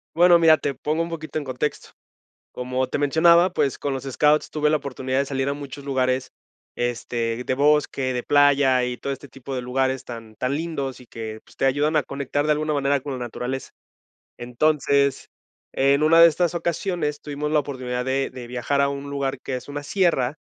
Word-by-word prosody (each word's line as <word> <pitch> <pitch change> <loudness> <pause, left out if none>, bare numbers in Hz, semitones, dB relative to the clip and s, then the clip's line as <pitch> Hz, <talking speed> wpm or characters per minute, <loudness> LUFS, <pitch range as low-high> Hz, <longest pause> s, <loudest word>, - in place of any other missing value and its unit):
Bueno, 175 0 +6
mira, 160 -1 +6
te 140 - -2
pongo 155 +5 -1
un 170 - -5
poquito 155 -1 -5
en 155 - -2
contexto, 130 +3 -3 0.6
como 130 +1 -2
te - - -3
mencionaba, 170 +5 +5
pues, 135 - 0
con 140 - -2
los 135 0 -4
scouts 150 +3 +2
tuve 150 -1 +1
la 155 - +3
oportunidad 130 -1 -4
de 140 - +1
salir 135 0 -2
a - - 0
muchos 140 0 -8
lugares, 130 -1 -1 0.4
este, 120 -1 -2
de 130 - -1
bosque, 140 -2 +2
de 125 - -2
playa 140 -3 +4
y 125 0 -3
todo 140 - -4
este 140 +1 -10
tipo 135 +2 -7
de 125 - -2
lugares 130 +1 -1
tan 115 -2 -9
tan 130 +2 -2
lindos 140 -5 -4
y 125 - -15
que 110 -1 -7
pues - - -21
te - - +1
ayudan 145 +4 +1
a 150 - +3
conectar 140 +2 -2
de 155 - +2
alguna 150 0 0
manera 140 0 +1
con 140 +1 -6
la - - -4
naturaleza. 125 +2 -5 0.7
Entonces, 140 +2 +1 0.4
en 140 +2 +3
una 165 +2 +6
de 170 - +10
estas 170 +2 0
ocasiones 170 -3 -2
tuvimos 150 0 -4
la 155 - +3
oportunidad 130 -3 -3
de 135 +1 -1
de 125 -2 -9
viajar 125 +3 -1
a 140 - +3
un 140 0 -5
lugar 140 -1 -2
que 130 - -4
es 125 - -8
una 145 0 -5
sierra, 150 -5 +1
140 Hz, 200 wpm, -23 LUFS, 130-150 Hz, 0.7 s, de